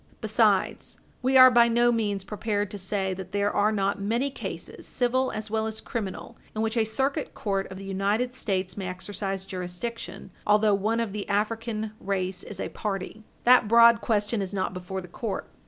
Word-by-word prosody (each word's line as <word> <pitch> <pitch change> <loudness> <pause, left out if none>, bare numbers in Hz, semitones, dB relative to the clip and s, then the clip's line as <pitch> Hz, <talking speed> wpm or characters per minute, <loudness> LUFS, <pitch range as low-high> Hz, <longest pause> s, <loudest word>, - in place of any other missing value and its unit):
Besides, - - +1 0.2
we 260 +1 +4
are 255 0 +10
by 235 -1 +6
no 240 +1 +3
means 205 -4 -1
prepared 205 0 -2
to 205 - -5
say 190 0 -1
that 185 0 -8
there 205 0 +1
are 210 +1 +2
not 200 -1 0
many 235 +7 0
cases, - - -7
civil 260 +1 +1
as 215 0 -5
well 220 0 0
as 220 0 -4
criminal, 190 -7 -5 0.2
in 215 - 0
which 225 +1 -1
a 225 -2 +3
Circuit 270 +6 -1
Court 195 -2 -2
of 190 - -7
the 195 - -8
United 200 +6 0
States 190 -7 -2
may 195 -2 -4
exercise 195 +1 -4
jurisdiction 185 +3 -6 0.2
although 210 0 +4
one 215 +4 +1
of 220 -4 -3
the 210 -1 -5
African 220 +1 -1
race 190 -1 -2
is 195 - -8
a - - -3
party; 200 0 -4 0.2
that 250 -3 +6
broad 235 +1 +7
question 210 0 0
is 195 +1 -4
not 185 -1 -1
before 185 +1 -5
the 180 - -10
court. 205 +4 -4
210 Hz, 190 wpm, -26 LUFS, 195-230 Hz, 0.2 s, are